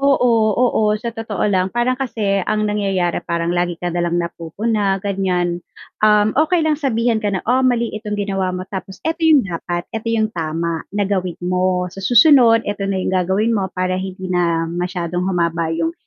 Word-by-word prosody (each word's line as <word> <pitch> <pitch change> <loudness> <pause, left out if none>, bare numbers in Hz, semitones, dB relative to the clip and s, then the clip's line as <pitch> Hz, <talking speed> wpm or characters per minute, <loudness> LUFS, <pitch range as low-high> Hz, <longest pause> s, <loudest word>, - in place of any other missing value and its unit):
Oo, 235 -6 +3
oo, 245 -2 +2
sa 235 +2 -5
totoo 225 -4 -3
lang 185 0 +1
parang 240 +4 0
kasi 205 -6 0
ang 215 0 +1
nangyayari 195 -4 0
parang 170 0 -1
lagi 175 -1 -1
ka 175 0 -4
nalang 175 0 0
napupuna 195 +5 -1
ganiyan, 180 -3 -1 0.4
um, 210 0 +4
okey 320 +3 +2
lang 305 -1 0
sabihan 230 -4 +1
ka 210 - -1
ng, 195 -2 -2
"Oh 250 +3 +2
mali 245 -3 +1
itong 210 -1 -4
ginawa 195 -2 -1
mo 180 - -5
tapos 190 0 -7
eto 325 +1 -2
yung 315 -6 +5
dapat, 175 -1 -4
eto 225 0 -4
yung 220 -1 0
tama 165 0 -2 0.2
na 205 - +2
gawin 185 -3 -2
mo, 180 0 0
sa 195 - -9
susunod, 240 +1 +5
eto 205 -1 -3
na 195 - -1
yung - - -1
gagawin 190 +5 +1
mo 195 -4 0
para 185 0 0
hindi 185 -1 -5
na 170 -2 +1
masyadong 175 +1 -3
humaba 170 -2 0
yung 165 0 -1
195 Hz, 185 wpm, -19 LUFS, 175-225 Hz, 0.4 s, yung